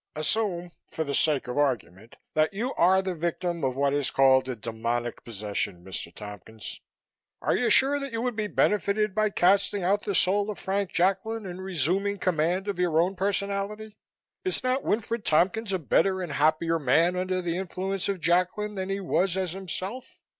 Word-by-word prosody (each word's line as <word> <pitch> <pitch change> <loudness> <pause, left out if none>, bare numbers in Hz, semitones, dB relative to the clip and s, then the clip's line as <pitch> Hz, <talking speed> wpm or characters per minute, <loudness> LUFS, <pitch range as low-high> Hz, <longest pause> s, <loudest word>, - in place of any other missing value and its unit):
Assume, 175 +2 -1 0.2
for 160 - -3
the 140 -2 -4
sake 145 -1 +2
of 125 +3 -2
argument, 115 -7 -2 0.2
that 155 +5 +1
you 245 +6 -2
are 190 +2 +4
the 190 -1 -2
victim 170 0 -2
of 130 -1 0
what 140 +1 +1
is 145 -2 +1
called 130 -1 +4
a 130 - -2
demoniac 115 +2 -3
possession, 100 -4 -3
Mr. 95 -3 -5
Tompkins. 105 +2 -9 0.6
Are - - +1
you 245 - +1
sure 280 +2 +5
that 275 -1 -5
you 230 - -3
would 250 -2 -1
be 215 -1 -1
benefited 210 0 +1
by 215 +1 +2
casting 200 +1 +2
out 200 +3 +2
the 200 - -2
soul 200 +4 +3
of 210 - -4
Frank 195 0 -2
Jacklin 205 +5 0
and 180 0 -6
resuming 190 +3 0
command 180 +2 0
of 200 -3 -3
your 170 -3 +2
own 180 +3 +2
personality? 200 +2 -2 0.5
Is 375 -7 -1
not 255 +1 +1
Winfred 225 +1 -1
Tompkins 195 +7 +2
a 190 - +1
better 185 +4 +2
and 180 -4 -4
happier 160 +3 +2
man 160 +6 +3
under 185 0 -1
the 170 -2 -2
influence 190 +1 -3
of 195 -2 -1
Jacklin 180 +5 +1
than 190 -1 -4
he 195 0 -1
was 190 -1 0
as 185 -3 -1
himself? 195 +6 -6
185 Hz, 180 wpm, -27 LUFS, 155-200 Hz, 0.6 s, sure